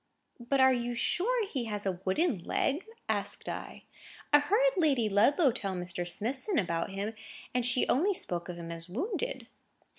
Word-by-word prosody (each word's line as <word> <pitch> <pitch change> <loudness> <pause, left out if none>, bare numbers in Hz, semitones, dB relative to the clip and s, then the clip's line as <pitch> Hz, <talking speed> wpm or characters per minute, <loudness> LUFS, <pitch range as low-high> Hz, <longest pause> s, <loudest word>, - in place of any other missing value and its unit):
"But 245 +3 0
are 260 0 +6
you 240 -1 -2
sure 430 - +1
he 265 -11 -3
has 210 -2 -3
a 185 -2 -1
wooden 220 - +1
leg?" 290 - -1 0.2
asked - - -2
I. - - -6 0.5
"I 295 - +9
heard 425 +12 +3
Lady 285 - +2
Ludlow 260 - +4
tell 195 -4 -3
Mr. 175 0 -3
Smithson 255 - 0
about 170 -6 0
him, 200 +3 -4 0.4
and 250 0 +1
she 245 +1 +4
only 370 +9 +2
spoke 175 - -3
of 175 - -4
him 170 -1 -7
as 165 +1 -5
wounded." 400 - -3
245 Hz, 170 wpm, -30 LUFS, 190-320 Hz, 0.5 s, I